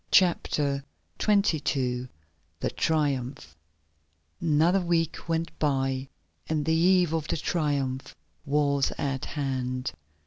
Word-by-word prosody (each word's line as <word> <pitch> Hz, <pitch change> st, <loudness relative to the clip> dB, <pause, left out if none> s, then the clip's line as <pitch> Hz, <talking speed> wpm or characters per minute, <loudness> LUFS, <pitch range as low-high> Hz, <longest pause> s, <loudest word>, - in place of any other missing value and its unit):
CHAPTER 145 Hz, -6 st, +3 dB, 0.4 s
XXII 145 Hz, -, +1 dB, 0.5 s
THE -, -, -1 dB
TRIUMPH 135 Hz, -, -1 dB, 0.9 s
Another 165 Hz, +4 st, +3 dB
week 170 Hz, -1 st, -1 dB
went 165 Hz, 0 st, 0 dB
by 135 Hz, -2 st, 0 dB, 0.4 s
and 155 Hz, -2 st, 0 dB
the 160 Hz, -, +2 dB
eve 175 Hz, 0 st, +4 dB
of 160 Hz, -2 st, -1 dB
the -, -, 0 dB
Triumph 140 Hz, -5 st, -1 dB, 0.3 s
was 140 Hz, -1 st, +2 dB
at 135 Hz, -3 st, -2 dB
hand. 130 Hz, -2 st, -2 dB
145 Hz, 100 wpm, -27 LUFS, 135-165 Hz, 0.9 s, eve